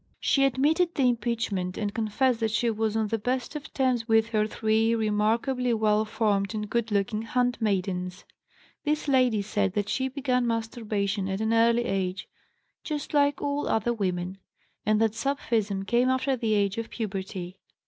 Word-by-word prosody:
She 275 -1 +3
admitted 305 +7 +2
the 275 - +1
impeachment 225 -6 0
and 205 -1 -2
confessed 230 +3 +1
that 225 -1 +1
she 230 +2 +1
was 220 0 -1
on 220 -1 0
the 225 - -1
best 250 +6 -2
of 295 - -7
terms 250 -4 0
with 225 0 +3
her 215 -2 +1
three 220 +1 +1
remarkably 230 +3 +1
well 215 0 +2
formed 210 -1 0
and 210 0 -3
good 235 +1 -1
looking 205 +1 0
handmaidens. 200 -7 -1 0.6
This 300 0 -1
lady 250 -6 +3
said 200 -2 0
that 205 0 -1
she 260 0 0
began 255 -2 0
masturbation 215 -4 -2
at 190 +1 -2
an 220 +1 +1
early 235 +1 +3
age, 190 -2 -2 0.6
'just 300 -2 -4
like 285 -1 +2
all 285 0 -1
other 225 +2 +1
women,' 185 -3 -2 0.5
and 215 0 +3
that 220 -1 +2
sapphism 225 -8 -1
came 240 +4 +2
after 260 +1 +1
the 225 -3 0
age 200 +1 +1
of 230 - -5
puberty. 190 -4 -5
225 Hz, 165 wpm, -27 LUFS, 205-250 Hz, 0.6 s, She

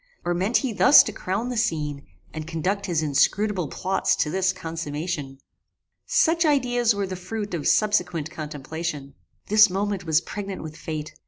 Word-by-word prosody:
Or 175 - +1
meant 190 +7 +1
he 260 -4 -2
thus 265 +7 +8
to - - -4
crown 205 +7 -3
the 250 - -3
scene, 150 -9 -2 0.3
and 155 0 -6
conduct 190 +5 -2
his 165 -3 0
inscrutable 180 +5 +1
plots 190 +6 0
to 150 - -1
this 190 +1 +1
consummation? 160 -4 -5 0.7
Such 335 +1 +3
ideas 245 -7 +2
were 200 -1 -1
the 185 -1 -5
fruit 205 +3 -5
of 160 -4 -2
subsequent 180 -7 +1
contemplation. 150 -1 -5 0.3
This 215 0 +6
moment 195 +1 -2
was 160 -2 +3
pregnant 195 +2 -6
with 155 -1 -8
fate. 155 -1 -6
180 Hz, 160 wpm, -24 LUFS, 155-205 Hz, 0.7 s, thus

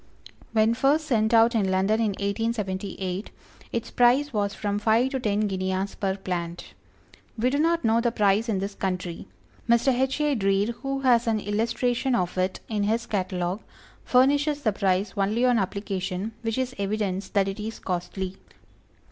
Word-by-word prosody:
When 220 0 +3
first 280 +6 +2
sent 220 -6 +1
out 230 +1 +5
in 205 -4 +1
London 190 +4 +2
in 220 -2 +1
1878, 200 -2 -3 0.4
its 235 -1 -3
price 255 +4 +3
was 200 -2 -1
from 205 0 -2
five 230 +4 +2
to 265 - -1
ten 210 -3 0
guineas 190 -1 -1
per 195 -1 -2
plant. 175 -3 -5 0.6
We 245 +3 +1
do 285 - 0
not 335 +2 +2
know 225 +1 +3
the 235 0 +1
price 210 +1 +2
in 210 - +1
this 195 +1 -3
country. 180 -3 -4 0.4
Mr. 235 +3 +4
H. 265 +3 0
A. 295 -1 +2
Dreer 195 -1 +1
who 275 0 -2
has 240 -2 +3
an 220 -1 +2
illustration 235 +5 0
of 180 -5 -1
it 185 +1 -1
in 215 -2 -1
his 225 +3 0
catalogue, 185 -2 -2 0.4
furnishes 285 +3 +3
the 215 - +2
price 195 0 0
only 210 +5 +1
on 245 -2 +4
application, 195 0 -3
which 225 0 -2
is 255 -1 -1
evidence 200 -1 -2
that 200 -2 +2
it 195 +2 -4
is 220 +2 -5
costly. 185 +1 -4
215 Hz, 165 wpm, -25 LUFS, 195-240 Hz, 0.6 s, out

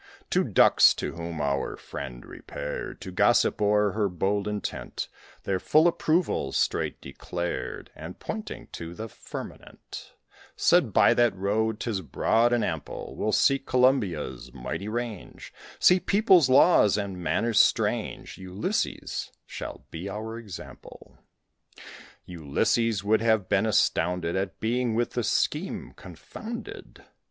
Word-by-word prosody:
Two - - +3
Ducks, - - +5
to - - -4
whom 85 -1 -6
our 70 -1 -1
friend - - -8
repaired - - -6
To 95 - -7
gossip 115 +4 +3
o'er 105 0 +3
her 105 0 0
bold 100 +3 -1
intent, 105 -2 -4 0.4
Their 95 -1 -1
full 155 - +4
approval 170 0 0
straight - - 0
declared; 85 +6 -5
And, 80 +3 -9
pointing 215 -1 -6
to 85 +1 -7
the 110 +3 -6
firmament, - - -10 0.4
Said, - - +3
"By - - +5
that 120 -4 +3
road 105 +3 0
'tis 110 -7 -2
broad 115 +7 +2
and 120 -2 +2
ample 80 -3 -5
We'll 110 - -1
seek 135 +4 +2
Columbia's 90 - +1
mighty 100 - -5
range, 115 -3 -6 0.2
See 180 +1 +5
peoples, 185 - +4
laws, 130 - +5
and 100 -3 -4
manners 105 +7 +1
strange; - - +1
Ulysses 95 +2 -3
shall - - -8
be 90 +5 -6
our 110 +3 -5
example." 100 -7 -11 1.1
(Ulysses 95 +6 0
would 110 +1 +2
have 110 -4 +2
been 100 +3 +2
astounded 90 -5 +1
At 95 0 -3
being 120 0 0
with 120 +1 0
this 120 -4 -1
scheme 160 +6 -1
confounded.) 250 - -9
105 Hz, 125 wpm, -26 LUFS, 90-120 Hz, 1.1 s, Ducks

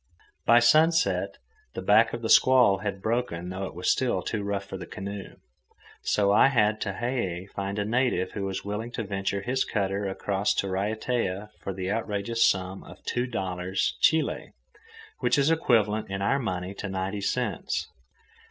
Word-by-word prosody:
By 120 - +7
sunset, 155 +7 +3 0.4
the - - -3
back - - +5
of - - -6
the - - -2
squall 125 -7 +6
had 100 -1 -4
broken 110 -7 -1
though 95 +1 -4
it 95 - -8
was 90 - +1
still 130 -2 0
too 110 - -2
rough 100 0 -2
for 100 - -7
the 90 -2 -7
canoe. 100 0 -7 0.7
So 100 -1 +2
I 105 - +6
had 110 -5 +2
Tehei 95 -4 -2
find 100 +1 -4
a 100 - 0
native 115 -5 +1
who 100 -2 -4
was 95 0 -4
willing 105 +3 -3
to 115 - -3
venture 100 0 -2
his 130 +3 0
cutter 100 -1 -1
across 100 +1 -1
to 100 - 0
Raiatea 105 +1 -2
for 100 - -5
the 95 0 -3
outrageous 110 +1 -1
sum 95 0 -3
of - - -14
two 120 +1 -1
dollars, 95 -4 -2
Chili, 160 -1 +2 0.7
which 125 +1 +2
is 140 +3 +3
equivalent 110 -10 +2
in 100 0 -3
our 135 +7 +2
money 95 -5 -3
to 100 0 -6
ninety 95 +2 -3
cents. 110 -2 -2
100 Hz, 170 wpm, -27 LUFS, 95-120 Hz, 0.7 s, By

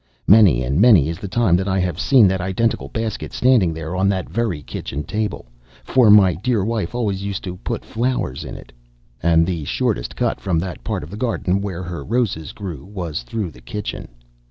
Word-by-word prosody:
Many 95 - +6
and 70 +8 +1
many 100 - +6
is 85 +1 -5
the 100 - -6
time 95 -2 +2
that 95 +2 -2
I 95 -1 +1
have 90 -2 -1
seen 120 +2 +5
that 95 -1 -1
identical 95 +5 -1
basket 110 -2 -4
standing 125 -9 +3
there 80 +2 -5
on 95 +1 +2
that 95 -2 -1
very 110 -11 -2
kitchen 70 +1 -5
table, 105 +2 -3 0.4
for 125 -4 +4
my 100 -3 +7
dear 105 +2 0
wife 115 -2 -2
always 100 -6 -1
used 100 0 -4
it 90 - -3
to 90 - -9
put - - -5
flowers 115 - -2
in, - - -7 0.6
and 85 0 +4
the 85 -3 -3
shortest - - -2
cut - - -1
from 90 -4 0
that 90 +1 -4
part - - -3
of 75 - -10
the 105 - -7
garden 105 -5 0
where 95 -3 -4
her 85 -1 -6
roses 110 - -1
grew 85 -10 -7
was 90 -8 -5
through 95 - -4
the - - -16
kitchen. 105 -4 -5
95 Hz, 205 wpm, -20 LUFS, 85-110 Hz, 0.6 s, my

